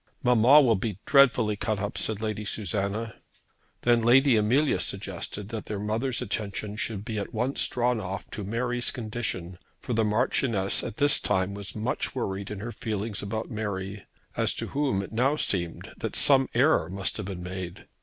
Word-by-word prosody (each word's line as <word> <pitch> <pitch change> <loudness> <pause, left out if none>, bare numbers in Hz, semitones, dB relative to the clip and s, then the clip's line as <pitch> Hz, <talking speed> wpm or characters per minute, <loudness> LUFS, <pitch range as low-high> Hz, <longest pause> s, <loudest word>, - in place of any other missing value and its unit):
"Mamma 125 +3 +7
will 125 -5 +4
be 100 -1 -3
dreadfully 125 -6 +4
cut 105 +1 -1
up," 100 +1 -3
said 110 -1 -1
Lady 110 -1 -2
Susanna. 105 +2 -2 0.7
Then 120 -1 +4
Lady 130 +3 +5
Amelia 125 +8 +2
suggested 100 +1 -4
that 110 -2 -6
their 105 - -3
mother's 110 +5 -1
attention 105 0 -3
should 105 -2 -3
be 110 -3 -3
at 100 +3 -6
once 125 +5 +1
drawn 125 -1 0
off 95 0 -5
to 105 - -5
Mary's 120 +4 -1
condition, 110 -7 -4 0.2
for 125 - -4
the 115 0 +2
Marchioness 110 -2 +1
at - - -6
this 145 0 +5
time 95 -1 0
was 100 -1 -6
much 110 +5 -2
worried 100 -5 -3
in 105 -2 -6
her 120 +2 -5
feelings 110 -2 -3
about 110 +4 -4
Mary, 100 -2 -4 0.3
as - - +1
to - - -3
whom 135 -9 0
it - - -9
now 130 +6 +2
seemed 85 - -1
that - - -4
some 135 -2 +5
error 125 - +3
must 95 +1 -1
have 105 -3 -5
been 90 -3 -6
made. 90 -1 -6
110 Hz, 175 wpm, -27 LUFS, 100-120 Hz, 0.7 s, Mamma